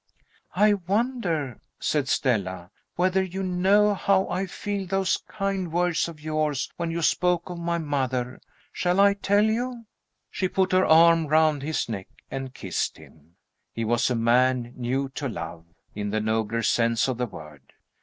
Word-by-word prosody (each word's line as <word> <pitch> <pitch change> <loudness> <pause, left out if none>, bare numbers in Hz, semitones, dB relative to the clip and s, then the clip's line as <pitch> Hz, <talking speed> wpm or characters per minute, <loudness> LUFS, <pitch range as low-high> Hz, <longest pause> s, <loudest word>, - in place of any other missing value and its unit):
"I 210 0 +5
wonder," 190 - -1 0.2
said 145 -3 0
Stella, 95 -8 -1 0.2
"whether 185 +2 +2
you 190 +1 -4
know 195 +3 +3
how 195 -1 +2
I 185 +2 -2
feel 200 0 -4
those 195 0 +1
kind 195 -4 -2
words 175 -1 +1
of 165 -2 -10
yours 155 -2 -1
when 170 -1 -3
you 165 0 -2
spoke 180 +2 +1
of 175 - -6
my 170 0 -1
mother. 130 -5 -2 0.3
Shall 180 +1 0
I 200 0 +6
tell 200 +1 +2
you?" 235 +2 -2 0.5
She 185 - -1
put 190 0 0
her 185 0 +3
arm 165 0 +6
round 155 -1 +3
his 155 +2 -2
neck 100 -5 -5 0.2
and 135 -1 -4
kissed 95 -8 -3
him. 80 +2 -18 0.4
He 115 - -3
was 120 +3 +2
a 125 - 0
man 120 +1 +2
new 130 +3 -1
to 135 +1 -4
love, 85 -7 -7 0.3
in 105 0 -3
the 110 +1 0
nobler 110 +1 -1
sense 115 0 +2
of 125 -2 -2
the 125 - 0
word. 75 -7 -11
160 Hz, 165 wpm, -25 LUFS, 120-190 Hz, 0.5 s, I